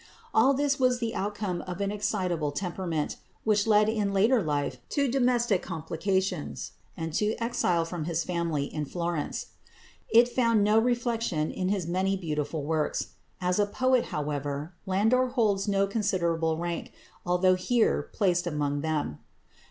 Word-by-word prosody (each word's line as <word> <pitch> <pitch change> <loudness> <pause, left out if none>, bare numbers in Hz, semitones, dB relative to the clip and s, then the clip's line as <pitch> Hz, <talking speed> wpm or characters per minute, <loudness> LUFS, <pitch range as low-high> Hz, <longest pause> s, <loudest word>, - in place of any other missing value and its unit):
All 275 +1 +5
this 280 0 +1
was 255 -1 +3
the 230 -2 -2
outcome 205 -3 -2
of 180 0 -5
an 200 0 0
excitable 185 -7 -1
temperament, 170 -1 -3 0.3
which 210 -1 +2
led 210 -1 +5
in 215 -2 0
later 225 +5 +4
life 145 -4 -1
to 285 -2 +1
domestic 240 -6 +2
complications, 165 - -2 0.3
and 165 -1 -4
to 210 +5 +1
exile 180 -8 +1
from 165 -2 -4
his 165 -1 -1
family 170 -5 -1
in 150 +1 -4
Florence. 170 -1 -3 0.6
It 235 +2 +6
found 230 -4 +2
no 210 +2 +5
reflection 230 -9 0
in 185 0 -2
his 195 -4 0
many 190 +3 0
beautiful 150 -3 -3
works. 155 0 -1 0.3
As 180 +1 0
a 205 - +3
poet, 255 +3 +2
however, 145 +2 -3
Landor 225 +7 +3
holds 215 -6 +1
no 200 -1 +2
considerable 170 -6 0
rank, 170 0 -4 0.3
although 180 +1 +3
here 220 +6 +1
placed 180 -4 +1
among 145 -3 -1
them. 155 - -2
185 Hz, 145 wpm, -28 LUFS, 165-220 Hz, 0.6 s, It